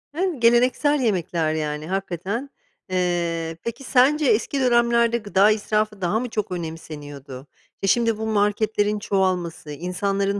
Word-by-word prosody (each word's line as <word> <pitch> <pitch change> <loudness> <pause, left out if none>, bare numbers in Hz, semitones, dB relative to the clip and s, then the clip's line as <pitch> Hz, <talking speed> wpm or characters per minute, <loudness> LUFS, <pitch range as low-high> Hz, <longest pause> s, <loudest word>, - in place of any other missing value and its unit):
Hımm, 355 -4 -1
geleneksel 250 +5 +3
yemekler, 175 -8 0
yani, 150 -1 -3
hakikaten. 195 - -3 0.4
Eee, 170 -3 -1
peki 235 +4 -5
sence 275 +4 +3
eski 255 +3 +1
dönemlerde 235 -2 +3
gıda 205 -2 +3
israfı 215 -1 -1
daha 185 +5 +1
mı 250 +1 -4
çok 215 -3 -3
önemseniyordu? 150 -5 -7 0.3
E, 195 - 0
şimdi, 230 +1 +2
bu 220 - -4
marketlerin 210 0 +1
çoğalması, 185 -6 -1
insanların 195 +5 -1
205 Hz, 125 wpm, -23 LUFS, 175-235 Hz, 0.4 s, geleneksel